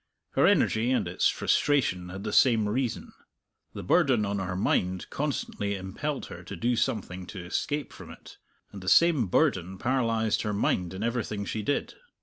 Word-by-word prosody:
Her -, -, +3 dB
energy, 110 Hz, +3 st, +3 dB
and 130 Hz, -, +1 dB
its -, -, +1 dB
frustration, 105 Hz, -12 st, +1 dB
had 95 Hz, +2 st, -7 dB
the 105 Hz, -1 st, -3 dB
same 115 Hz, -5 st, +4 dB
reason. 120 Hz, +2 st, -2 dB, 0.6 s
The -, -, -6 dB
burden 130 Hz, -, +3 dB
on 100 Hz, 0 st, -2 dB
her 90 Hz, -1 st, -3 dB
mind 90 Hz, -1 st, 0 dB
constantly 130 Hz, -8 st, -2 dB
impelled 100 Hz, +10 st, -4 dB
her 90 Hz, -, -9 dB
to 95 Hz, +3 st, -7 dB
do 120 Hz, +7 st, 0 dB
something 95 Hz, -5 st, -2 dB
to 90 Hz, -3 st, -8 dB
escape 145 Hz, +10 st, -2 dB
from -, -, -11 dB
it, -, -, -13 dB, 0.3 s
and 100 Hz, -, -9 dB
the 90 Hz, -, -2 dB
same 160 Hz, -, +5 dB
burden 95 Hz, -, +1 dB
paralyzed 115 Hz, -3 st, 0 dB
her 105 Hz, -1 st, -2 dB
mind 95 Hz, -3 st, 0 dB
in 95 Hz, -, -4 dB
everything 115 Hz, -3 st, -2 dB
she 110 Hz, -, -3 dB
did. 145 Hz, +7 st, -1 dB
105 Hz, 170 wpm, -28 LUFS, 95-125 Hz, 0.6 s, same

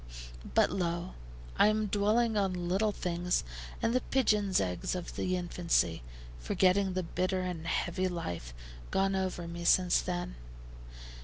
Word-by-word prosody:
But, -, -, +4 dB
lo! 175 Hz, -1 st, -2 dB, 0.5 s
I -, -, +7 dB
am 215 Hz, 0 st, +2 dB
dwelling 215 Hz, +3 st, +2 dB
on 185 Hz, -4 st, 0 dB
little 200 Hz, +4 st, +2 dB
things 180 Hz, -2 st, -1 dB, 0.4 s
and 230 Hz, -, +2 dB
the 255 Hz, -, +2 dB
pigeons' 210 Hz, -8 st, +2 dB
eggs 90 Hz, -, -2 dB
of 180 Hz, -1 st, -6 dB
the 185 Hz, 0 st, 0 dB
infancy, 170 Hz, -, 0 dB, 0.4 s
forgetting 185 Hz, -, +2 dB
the 185 Hz, 0 st, -1 dB
bitter 185 Hz, +2 st, -1 dB
and 175 Hz, -3 st, -4 dB
heavy 185 Hz, +2 st, 0 dB
life 90 Hz, -, -4 dB, 0.4 s
gone 195 Hz, 0 st, +1 dB
over 185 Hz, -2 st, -2 dB
me 170 Hz, 0 st, -6 dB
since 180 Hz, +1 st, +4 dB
then. 175 Hz, -, -4 dB
185 Hz, 140 wpm, -31 LUFS, 170-195 Hz, 0.5 s, I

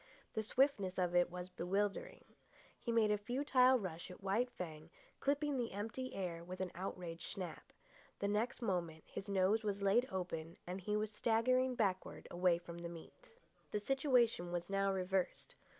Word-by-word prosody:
The 220 Hz, -, 0 dB
swiftness 215 Hz, -5 st, +2 dB
of 180 Hz, -1 st, +1 dB
it 175 Hz, 0 st, +5 dB
was 180 Hz, +1 st, -6 dB
bewildering. 200 Hz, -, -1 dB, 0.5 s
He 235 Hz, -, -2 dB
made 225 Hz, -2 st, +4 dB
a 210 Hz, -, +2 dB
futile 255 Hz, +3 st, +4 dB
rush 180 Hz, -6 st, -5 dB
at 180 Hz, +2 st, -11 dB
White 215 Hz, +6 st, +2 dB
Fang, 160 Hz, -9 st, -7 dB, 0.3 s
clipping 290 Hz, 0 st, +1 dB
the 235 Hz, -4 st, -1 dB
empty 225 Hz, +6 st, -4 dB
air 175 Hz, -3 st, -3 dB
with 185 Hz, +2 st, -7 dB
an 185 Hz, -1 st, -2 dB
outraged 175 Hz, -2 st, -5 dB
snap. 180 Hz, -5 st, -6 dB, 0.5 s
The 200 Hz, -, -1 dB
next 220 Hz, +4 st, 0 dB
moment 170 Hz, -6 st, -1 dB
his 200 Hz, -, -7 dB
nose 200 Hz, +3 st, +3 dB
was 200 Hz, -1 st, -1 dB
laid 225 Hz, +6 st, +4 dB
open, 170 Hz, -3 st, -3 dB
and 185 Hz, +2 st, -4 dB
he 210 Hz, +3 st, 0 dB
was 215 Hz, 0 st, -1 dB
staggering 250 Hz, +4 st, +2 dB
backward 195 Hz, -6 st, -1 dB
away 175 Hz, -1 st, +3 dB
from 170 Hz, 0 st, -8 dB
the 170 Hz, 0 st, -5 dB
meat. 170 Hz, -, -12 dB, 0.4 s
The 210 Hz, -, -1 dB
situation 240 Hz, -, +2 dB
was 175 Hz, +2 st, -3 dB
now 195 Hz, 0 st, +2 dB
reversed. 190 Hz, 0 st, -1 dB
195 Hz, 165 wpm, -38 LUFS, 180-230 Hz, 0.5 s, it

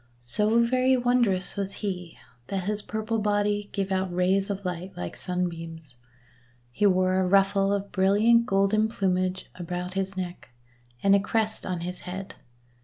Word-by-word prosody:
So 215 Hz, -, +2 dB
very 255 Hz, +2 st, +3 dB
wondrous 240 Hz, -7 st, +1 dB
was 195 Hz, -1 st, -3 dB
he 180 Hz, -5 st, -5 dB, 0.3 s
that 195 Hz, -2 st, -2 dB
his 210 Hz, +2 st, -1 dB
purple 220 Hz, +1 st, -2 dB
body 205 Hz, 0 st, 0 dB
gave 195 Hz, -1 st, -2 dB
out 190 Hz, -1 st, 0 dB
rays 185 Hz, +3 st, +1 dB
of 200 Hz, -1 st, -4 dB
light 180 Hz, +1 st, -5 dB
like 90 Hz, -1 st, -5 dB
sunbeams. 165 Hz, -5 st, -4 dB, 0.8 s
He 205 Hz, +12 st, +2 dB
wore 185 Hz, 0 st, +3 dB
a 185 Hz, -, +1 dB
ruffle 195 Hz, +1 st, +3 dB
of 200 Hz, 0 st, -2 dB
brilliant 215 Hz, +5 st, +4 dB
golden 200 Hz, +2 st, +3 dB
plumage 185 Hz, -3 st, -1 dB
about 180 Hz, +1 st, -5 dB
his 195 Hz, 0 st, -3 dB
neck, 180 Hz, -1 st, -5 dB, 0.5 s
and 195 Hz, 0 st, +6 dB
a -, -, +5 dB
crest 220 Hz, +1 st, -1 dB
on 180 Hz, -2 st, -2 dB
his 180 Hz, +1 st, -4 dB
head. 190 Hz, +2 st, -7 dB
195 Hz, 155 wpm, -26 LUFS, 180-210 Hz, 0.8 s, and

